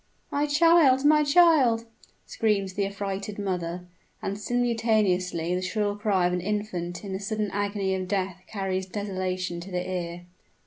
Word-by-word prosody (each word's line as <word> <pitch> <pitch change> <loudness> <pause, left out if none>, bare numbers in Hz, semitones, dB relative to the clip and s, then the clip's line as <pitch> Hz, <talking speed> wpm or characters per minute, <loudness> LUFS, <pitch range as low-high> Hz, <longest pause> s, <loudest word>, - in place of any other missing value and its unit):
"My 290 +1 +1
child! 290 -3 +5
my 300 0 +6
child!" 285 -7 +4 0.4
screams 200 -4 0
the 200 0 0
affrighted 200 +1 -4
mother; 180 -3 -3 0.3
and 195 - -3
simultaneously 210 -7 0
the 180 - -1
shrill 205 +2 -1
cry 205 -4 +1
of 180 - +1
an 180 - -1
infant 185 -3 -3
in 195 -2 -5
the 190 - -3
sudden 210 0 -2
agony 200 -1 -1
of 185 -1 -2
death 185 -2 -2
carries 190 -2 -3
desolation 185 -3 -3
to 175 +3 -9
the 180 -1 -3
ear! 175 -1 -4
200 Hz, 150 wpm, -26 LUFS, 185-220 Hz, 0.4 s, my